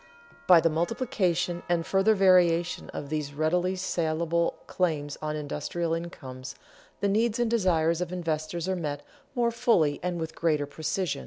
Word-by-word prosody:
By 180 -2 +8
the 165 - +3
multiplication 180 -2 0
and 170 -1 +1
further 195 +3 +3
variation 180 -3 +3
of 140 - -6
these 150 -2 -3
readily 175 +5 +1
salable 170 -2 0
claims 150 -6 -1
on 155 0 -2
industrial 150 +3 -3
incomes, 130 -7 -6 0.5
the 200 - +2
needs 220 +3 +1
and 240 -2 0
desires 170 -6 +2
of 180 - -3
investors 165 -1 -3
are 190 - 0
met 145 -4 -4 0.3
more 235 -1 +2
fully 225 -12 +2
and 180 -1 -2
with 160 -1 -4
greater 155 -4 +1
precision. 160 +4 -2
170 Hz, 150 wpm, -27 LUFS, 155-185 Hz, 0.5 s, By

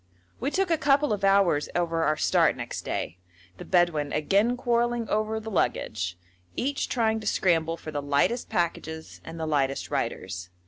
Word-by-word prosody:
We 265 - -1
took 375 +3 0
a 325 - +2
couple 280 -3 +3
of 205 -1 -4
hours 195 -7 +3
over 165 -1 0
our 155 0 +2
start - - +3
next - - -5
day, 85 +4 -4 0.4
the - - -8
Bedouin 170 -5 +2
again 200 +10 +2
quarrelling 240 -1 0
over 215 +1 0
the 220 0 -7
luggage, 90 - -1 0.4
each 275 +2 -1
trying 220 -3 +1
to 215 - -7
scramble 165 -4 +1
for 155 - -8
the 145 -1 -2
lightest 145 - +1
packages 160 -2 -3
and 165 0 -8
the 160 - -2
lightest 140 -3 0
riders. 90 -1 -3
175 Hz, 170 wpm, -27 LUFS, 150-230 Hz, 0.4 s, couple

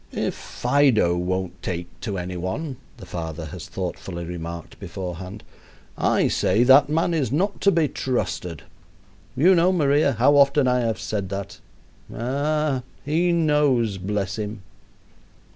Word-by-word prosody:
"If - - -1
Fido 125 -9 +2
won't 90 0 -2
take 85 -1 -3
to 100 -5 -4
any 90 0 -4
one," 120 - -4 0.2
the 100 - -10
father 80 -2 -5
has 75 - -8
thoughtfully 85 0 -5
remarked 85 -1 -7
beforehand, 95 +2 -7 0.5
"I - - +2
say 115 - +2
that 135 +3 +6
man 165 +3 +1
is 140 -8 0
not 190 +8 0
to 200 - +5
be 165 -4 +2
trusted. 90 - -3 0.7
You 180 +7 +6
know, 180 +1 +4
Maria, 145 -4 +3
how 130 +6 +4
often 140 -1 +5
I 125 0 +3
have 115 -2 -1
said 100 -3 -3
that. 100 0 -5 0.5
Ah! 140 +3 -1 0.2
he 165 +4 +2
knows, 145 - +2
bless 100 0 -2
him." 105 -1 -5
120 Hz, 140 wpm, -23 LUFS, 95-145 Hz, 0.7 s, that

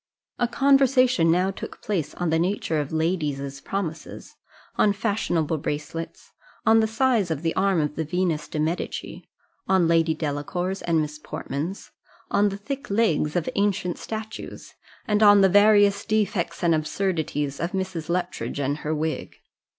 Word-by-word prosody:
A 240 - +2
conversation 255 -8 +4
now 180 +3 +2
took - - -8
place 180 -8 -3
on 175 -2 -1
the 160 - +2
nature 170 -3 0
of 145 -2 -3
ladies' 150 -4 -2
promises 170 -5 -5 0.4
on 205 - +3
fashionable 195 -7 -1
bracelets 150 +3 -5 0.3
on 225 0 +6
the 220 - +3
size 225 -4 +1
of 160 -1 -3
the 165 - 0
arm 195 -2 +2
of 150 -1 -1
the 160 - -1
Venus 170 -1 -1
de 155 - -4
Medici 160 +3 -3 0.4
on 190 -3 +3
Lady 165 -1 +3
Delacour's 160 +5 -3
and 165 -2 +1
Miss 150 0 -5
Portman's 155 +5 -5 0.4
on 205 0 +3
the 195 - -5
thick 275 +7 -6
legs 190 -8 +1
of 175 -3 0
ancient 195 -3 0
statues 220 0 -7 0.3
and 210 -3 +1
on 205 -1 +7
the 195 - +6
various 205 0 +5
defects 200 -6 -1
and 170 -1 +4
absurdities 155 -3 -1
of 170 +4 -3
Mrs. 185 -4 -3
Luttridge 175 -4 -2
and 140 +1 -1
her 155 +1 -2
wig. 155 +1 -3
175 Hz, 155 wpm, -24 LUFS, 155-205 Hz, 0.4 s, on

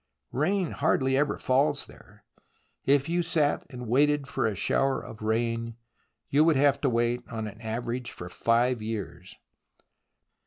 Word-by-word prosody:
Rain 175 +6 0
hardly 135 -3 +1
ever 145 +2 +1
falls 135 +3 +1
there.... - - -18 0.6
If 140 0 +3
you 175 +1 +1
sat 160 -3 0
and 125 -3 -8
waited 145 +4 +3
for 140 - 0
a 105 - -2
shower 135 +8 +1
of 110 - -10
rain, 115 +1 -1 0.5
you 145 +2 +4
would 160 -1 +4
have 140 0 +3
to 140 - +2
wait 120 +1 +1
on 110 -1 -4
an 105 +1 -9
average 120 +2 -3
for 85 - -8
five 115 +5 +1
years 105 -4 -6
125 Hz, 150 wpm, -27 LUFS, 115-145 Hz, 0.6 s, you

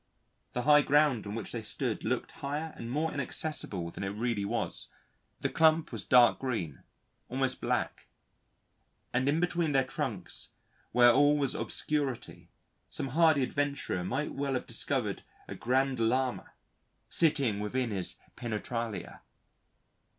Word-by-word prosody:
The 125 - -1
high 150 +1 +7
ground 145 -6 +3
on 100 - -4
which 115 -3 -5
they - - -3
stood - - -3
looked - - -1
higher 150 +3 -4
and 115 - -7
more 155 +5 -1
inaccessible 125 - -2
than - - -6
it - - -1
really 110 +1 -1
was, - - -2 0.5
the - - +2
clump 160 0 +3
was - - -3
dark 125 -3 +6
green, 110 - -3 0.5
almost 130 +1 0
black, - - -1 1.1
and 130 +3 +2
in 155 +3 +2
between 175 -3 +1
their 135 -1 +4
trunks 130 - -5 0.4
where 120 0 +7
all 145 +4 +5
was 140 -3 +1
obscurity, 145 -5 -2 0.4
some 135 - -3
hardy 155 -1 +4
adventurer 140 -9 -1
might 135 +11 -2
well 140 -1 -1
have 125 - -2
discovered - - -2 0.2
a - - -6
Grand 130 +1 +1
Lama 125 +2 0 0.5
sitting 140 -10 +2
within 120 +3 -1
his 95 -3 -2 0.2
Penetralia. 115 -1 -4
130 Hz, 135 wpm, -30 LUFS, 115-145 Hz, 1.1 s, high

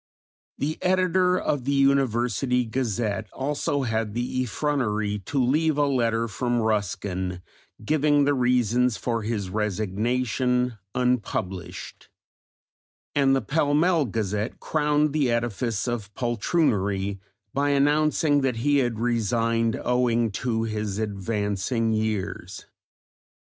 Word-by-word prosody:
The 150 +3 -2
editor 185 0 +2
of 140 -8 -1
the 140 - +1
University 125 -3 +2
Gazette 110 -3 -2
also 145 0 -1
had 110 -3 -2
the 125 +1 -1
effrontery 110 -5 -1
to 145 - -3
leave 150 +4 +2
a 145 - +3
letter 115 -4 +1
from 120 +2 -1
Ruskin, 95 -4 -2 0.4
giving 145 +1 +3
the 145 - +3
reasons 125 -2 +2
for 115 -2 -2
his 105 -4 -3
resignation, 115 +4 0 0.2
unpublished; 95 -8 -2 1.0
and 135 -1 +3
the 135 - 0
Pall 145 +5 +1
Mall 165 -1 +3
Gazette 105 -1 -2
crowned 150 -1 +1
the 145 -5 +2
edifice 115 -2 -1
of 115 -5 -3
poltroonery 105 - 0 0.3
by 140 +1 +1
announcing 145 +1 +3
that 135 -3 0
he 145 +5 +2
had 120 -4 0
resigned 115 0 0
owing 120 -2 +1
to 115 +2 -1
his 105 -3 -3
"advancing 105 +2 -1
years." 105 -4 -3
120 Hz, 110 wpm, -25 LUFS, 105-140 Hz, 1.0 s, a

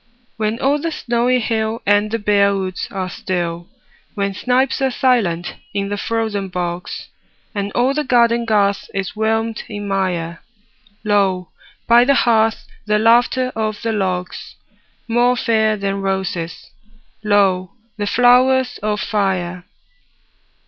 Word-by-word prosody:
When 215 +1 -1
all 280 +3 +2
the 330 +1 -2
snowy 245 -2 +1
hill 220 -1 -2
And 205 +1 +3
the 230 - -1
bare 200 -2 +2
woods 185 -1 -3
are 190 -1 -3
still; 175 -2 -4 0.5
When 200 -1 -1
snipes 255 +6 0
are 265 - +2
silent 225 -10 +1 0.2
in 200 0 -1
the 205 - -2
frozen 215 -2 -2
bogs, 175 -1 -5 0.4
And 200 -1 -3
all 250 +3 +2
the 300 +1 -1
garden 235 -2 +3
garth 200 -3 +1
is 195 +1 -3
whelmed 225 +1 -1
in 205 -1 -5
mire, 180 -4 -2 0.6
Lo, 195 -4 +1 0.4
by 235 +1 +6
the 280 +2 +3
hearth, 225 -3 +2 0.2
the 210 0 +3
laughter 240 +3 +3
of 215 -1 -2
the 225 - 0
logs— 185 -3 -3 0.5
More 240 +2 +3
fair 220 -3 +2
than 200 0 -2
roses, 190 -3 -3 0.5
lo, 195 -3 +2 0.2
the 205 -1 -2
flowers 250 +2 +4
of 210 0 -1
fire! 185 -4 -1
210 Hz, 135 wpm, -19 LUFS, 195-235 Hz, 0.6 s, by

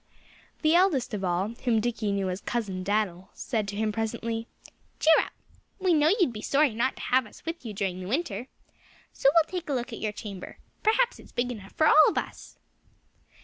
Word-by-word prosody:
The 310 +1 +4
eldest 340 - +3
of 200 -2 -3
all, 180 +2 0
whom 235 -3 +3
Dickie 220 -2 -1
knew 195 -2 0
as 180 - -5
Cousin 200 -6 -3
Dan'l, 190 -3 -1
said 220 -5 -2
to 200 - -5
him 215 +1 0
presently: 225 +1 -3 0.5
"Cheer 320 - +6
up! - - -2 0.5
We 370 -2 +2
know 305 +1 +4
you'd 335 -11 +3
be 210 - -6
sorry 280 +1 +2
not 245 +4 0
to - - -10
have 255 -2 +2
us - - -17
with 330 -1 -5
you 225 - -5
during 190 -3 -2
the 185 - -6
winter. 250 - -2 0.7
So 275 - +4
we'll 330 - +7
take 355 -4 -5
a - - 0
look 245 -2 -3
at - - -6
your 215 - -1
chamber. 200 -3 -8 0.2
Perhaps 470 +3 +2
it's - - -15
big 245 +1 -1
enough 200 -5 -9
for 315 - +2
all 310 0 +7
of - - -4
us." - - -5
230 Hz, 205 wpm, -27 LUFS, 205-295 Hz, 0.7 s, we'll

